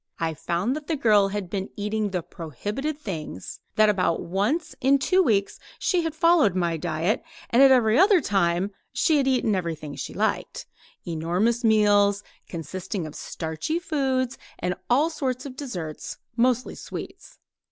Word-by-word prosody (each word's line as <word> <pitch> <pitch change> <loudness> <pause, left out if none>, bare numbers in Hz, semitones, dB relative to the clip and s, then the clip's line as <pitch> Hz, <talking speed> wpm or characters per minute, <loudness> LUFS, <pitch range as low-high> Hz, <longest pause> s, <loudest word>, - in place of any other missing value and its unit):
I 165 -1 -1
found 175 - -1
that 300 -1 -7
the 325 - 0
girl 215 -7 +4
had 200 -1 -4
been 190 +1 -4
eating 210 0 -1
the 180 -3 -2
prohibited 205 - -5
things; 160 - -6 0.2
that 215 0 +5
about 185 -5 +1
once 225 - -1
in 275 +2 +5
two 370 +8 +3
weeks 205 - +1 0.2
she 360 -2 +1
had 325 -2 -3
followed 315 - +4
my 170 -2 +1
diet, 165 +4 -1 0.3
and 240 - +5
at 275 - +9
every 240 -3 +4
other 390 0 +6
time 190 - +1 0.2
she 315 - +2
had 275 -2 +1
eaten 250 -5 +2
everything 165 -5 -3
she - - -6
liked - - -1 0.4
enormous 180 +9 0
meals, 205 -2 +4 0.3
consisting 185 +3 -5
of 155 - -8
starchy 160 - -3
foods 265 -7 -1 0.2
and 180 - -1 0.2
all 290 +7 +3
sorts 260 -5 -3
of 265 -2 -7
desserts 180 - -6 0.2
mostly 250 +1 +1
sweets. - - -9
210 Hz, 155 wpm, -25 LUFS, 175-270 Hz, 0.4 s, at